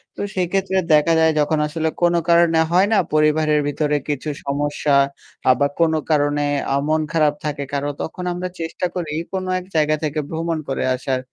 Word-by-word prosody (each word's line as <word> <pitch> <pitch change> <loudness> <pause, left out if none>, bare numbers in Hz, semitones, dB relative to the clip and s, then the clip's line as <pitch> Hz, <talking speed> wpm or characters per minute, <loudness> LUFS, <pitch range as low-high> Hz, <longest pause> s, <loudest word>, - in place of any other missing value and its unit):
তো - - -6
সেক্ষেত্রে 190 +1 0 0.2
দেখা 150 +2 +4
যায় 160 0 +4
যখন 150 +1 +1
আসলে 160 +1 -1
কোন 175 0 +4 0.2
কারণে 170 -1 +4
হয় 185 +3 +4
না? - - +4 0.2
পরিবারের 155 0 +3
ভিতরে 150 +1 0
কিছু 145 +1 -2 0.2
সমস্যা 145 0 0 0.5
আ - - +6
বা 140 - +3
কোন 165 -1 +3 0.2
কারণে 145 -1 +2 0.3
আ - - +2
মন 155 0 +2
খারাপ 155 -3 +3
থাকে 145 -1 -2
কারো 140 +1 -1
তখন 180 +3 -5
আমরা 180 +1 -4
চেষ্টা 165 +2 -3
করি 165 -4 -3 0.2
কোন 190 -1 -2 0.2
এক 180 - -11
জায়গা 155 0 +3
থেকে 155 0 -1
ভ্রমণ 165 0 -2
করে 135 - -1
আসার। 130 0 -2
155 Hz, 180 wpm, -20 LUFS, 145-170 Hz, 0.5 s, আ